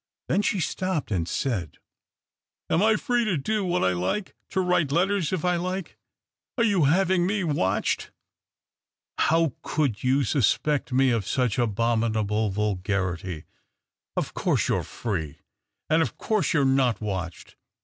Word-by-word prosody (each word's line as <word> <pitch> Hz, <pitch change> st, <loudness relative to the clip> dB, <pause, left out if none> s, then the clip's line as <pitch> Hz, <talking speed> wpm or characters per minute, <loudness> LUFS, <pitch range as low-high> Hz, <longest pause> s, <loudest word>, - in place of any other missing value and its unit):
Then 205 Hz, -, +2 dB
she 205 Hz, -1 st, 0 dB
stopped 185 Hz, -, -2 dB
and 85 Hz, -5 st, 0 dB
said 105 Hz, -, -2 dB, 0.3 s
— -, -, -67 dB
" -, -, -60 dB
Am 165 Hz, -, +3 dB
I 220 Hz, +1 st, +4 dB
free 240 Hz, +2 st, +1 dB
to 190 Hz, -6 st, +1 dB
do 210 Hz, +9 st, -1 dB
what 180 Hz, -1 st, 0 dB
I 95 Hz, -, +3 dB
like 95 Hz, -, -2 dB
— -, -, -54 dB
to -, -, -1 dB
write 180 Hz, -6 st, +2 dB
letters 185 Hz, +1 st, +1 dB
if 180 Hz, -3 st, -1 dB
I 180 Hz, -1 st, +2 dB
like? 185 Hz, 0 st, -4 dB, 0.6 s
Are 235 Hz, -, +3 dB
you 200 Hz, -9 st, +3 dB
having 180 Hz, +3 st, +3 dB
me 205 Hz, 0 st, 0 dB
watched? 145 Hz, -, 0 dB, 0.4 s
" -, -, -67 dB
" -, -, -60 dB
How 165 Hz, -3 st, +2 dB
could 140 Hz, -9 st, -1 dB
you 135 Hz, +2 st, +3 dB
suspect 145 Hz, +2 st, +1 dB
me 130 Hz, 0 st, +3 dB
of 115 Hz, -5 st, -1 dB
such 125 Hz, -4 st, 0 dB
abominable 110 Hz, -2 st, +1 dB
vulgarity? 95 Hz, -4 st, -2 dB, 0.7 s
Of -, -, -2 dB
course -, -, 0 dB
you -, -, +2 dB
are -, -, -3 dB
Free, 85 Hz, -11 st, -4 dB, 0.5 s
and 160 Hz, +1 st, +3 dB
of 140 Hz, -9 st, -2 dB
course 215 Hz, -3 st, 0 dB
you 150 Hz, -, +4 dB
are -, -, +2 dB
not 130 Hz, -3 st, +2 dB
watched. 95 Hz, -6 st, -5 dB
135 Hz, 170 wpm, -25 LUFS, -, 0.7 s, I